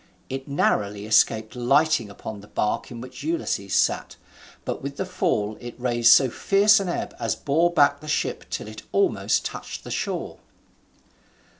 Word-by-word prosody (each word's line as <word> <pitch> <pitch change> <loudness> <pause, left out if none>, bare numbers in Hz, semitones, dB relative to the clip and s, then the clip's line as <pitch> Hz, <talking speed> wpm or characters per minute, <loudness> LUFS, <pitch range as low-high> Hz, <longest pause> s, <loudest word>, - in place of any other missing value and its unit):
It 135 +1 -5
narrowly 105 -7 0
escaped 110 +1 +2
lighting 125 -1 +2
upon 100 +1 -8
the 100 - -14
bark 105 - -2
in 120 -1 -8
which 130 - -10
Ulysses 330 +1 -2
sat, - - +1 0.5
but - - -3
with 140 0 -6
the 190 - -2
fall 110 - -1
it 120 0 -9
raised 120 -2 +4
so 135 - +7
fierce 200 - +4
an 195 -2 -3
ebb - - -3
as 115 -2 -1
bore 165 +5 +1
back 145 -3 +3
the 155 - -12
ship 155 - -1
till - - -4
it - - -9
almost 395 -1 +1
touched - - -6
the - - -8
shore. - - -3
130 Hz, 165 wpm, -24 LUFS, 110-165 Hz, 0.5 s, so